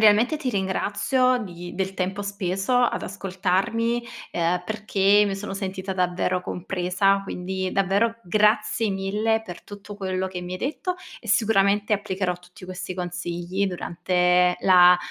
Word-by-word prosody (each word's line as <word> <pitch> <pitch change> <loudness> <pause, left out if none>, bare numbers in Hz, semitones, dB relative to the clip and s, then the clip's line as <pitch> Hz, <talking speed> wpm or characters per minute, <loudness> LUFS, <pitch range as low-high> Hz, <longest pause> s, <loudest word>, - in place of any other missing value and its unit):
realmente 220 +7 +5
ti 285 -4 -3
ringrazio 215 +6 +1
di 175 -5 -7
del 190 +1 -2
tempo 190 +2 -2
speso 195 +2 -2
ad 245 -1 +2
ascoltarmi, 200 +5 -1 0.3
ehm, 175 +1 0
perché 210 -1 +3
mi 195 - -1
sono 195 0 -5
sentita 190 -1 -4
davvero 180 0 0
compresa. 185 +2 0
Quindi 190 0 -3
davvero 200 +4 +2
grazie 215 +3 +2
mille 210 +4 0
per 175 -4 -9
tutto 205 0 -10
quello 190 -1 -2
che 180 -1 -6
mi 180 +1 -6
hai 185 - -4
detto 320 - -2 0.3
e, 230 - -14
sicuramente, 205 -1 +3
applicherò 190 -2 0
tutti 180 +1 -15
questi 185 0 -6
consigli 175 +2 -3
durante 180 0 +2
la 180 -1 +7
195 Hz, 140 wpm, -24 LUFS, 180-210 Hz, 0.3 s, la